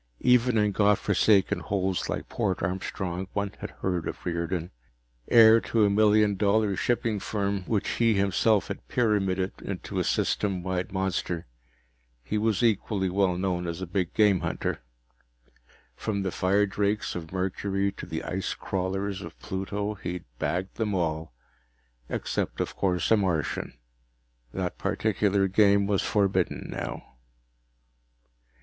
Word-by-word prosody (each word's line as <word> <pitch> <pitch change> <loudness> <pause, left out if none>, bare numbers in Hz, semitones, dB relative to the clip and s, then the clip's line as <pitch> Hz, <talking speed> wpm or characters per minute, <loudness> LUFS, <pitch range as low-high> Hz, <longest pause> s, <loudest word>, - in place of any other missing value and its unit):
Even 125 -1 +4
in 105 -1 +3
God 105 0 +3
forsaken 100 0 +3
holes 95 -2 -1
like - - -3
Port 100 -7 -1
Armstrong 95 0 -3
one 100 -1 -1
had - - -5
heard 90 -3 -3
of - - -6
Riordan. 85 0 -2 0.6
Heir 115 -1 +7
to 110 -2 +2
a 100 - +3
million 105 -1 +4
dollar 105 0 +2
shipping 115 0 0
firm 100 -1 -1
which 105 -1 0
he 115 -2 +2
himself 100 +1 +2
had - - -6
pyramided 95 -5 0
into - - -4
a - - +2
System 95 -4 0
wide 90 -1 -2
monster, 90 -3 -2 0.8
he 105 - -1
was 110 +1 +1
equally 100 -4 +1
well 95 -2 +2
known 90 -2 -1
as 85 0 -4
a 95 - -3
big 90 0 -1
game 105 -4 +4
hunter. - - -3 1.1
From 100 - -2
the 95 - -1
firedrakes 100 +2 +1
of 80 -2 -6
Mercury 95 +1 -1
to - - -9
the 80 - -4
ice 95 +1 -3
crawlers 95 +1 -2
of - - -9
Pluto, 100 +2 -3
he'd 90 -3 -6
bagged 90 +2 -2
them 105 -3 -1
all. 80 -3 -1 0.8
Except, - - -2
of - - -2
course, 90 -2 0
a 110 - +7
Martian. 90 -7 -1 0.7
That 90 +3 -3
particular 100 -1 +1
game 100 +1 +4
was 100 -1 +1
forbidden 100 -3 0
now. - - -5
100 Hz, 140 wpm, -27 LUFS, 90-105 Hz, 1.1 s, Heir